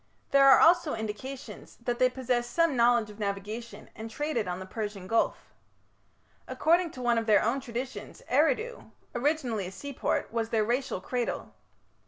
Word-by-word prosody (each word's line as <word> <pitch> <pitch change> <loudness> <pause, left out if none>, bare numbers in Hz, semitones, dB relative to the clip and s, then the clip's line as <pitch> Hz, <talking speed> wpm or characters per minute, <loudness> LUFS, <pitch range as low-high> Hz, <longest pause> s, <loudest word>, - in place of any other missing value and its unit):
There 275 0 +7
are 270 - +8
also 335 -4 +5
indications 220 +5 -7
that 240 0 -2
they 255 - +5
possessed 250 -2 -1
some 335 -2 +2
knowledge 235 -2 +3
of 210 - -15
navigation 210 +3 -5
and 220 +1 -7
traded 250 -4 -2
on 180 0 -3
the 190 - -7
Persian 205 -2 -5
Gulf. 225 +4 0 0.9
According 340 +2 +2
to 255 - -7
one 240 -1 +3
of 225 - -5
their 210 -2 +5
own 235 +5 +1
traditions 255 0 -6
Eridu, 485 +3 +1 0.2
originally 240 - 0
a - - -7
seaport, 270 +3 -3
was 225 -1 -1
their 220 -2 +2
racial 240 -4 -1
cradle. 245 +3 -3
240 Hz, 160 wpm, -29 LUFS, 220-270 Hz, 0.9 s, are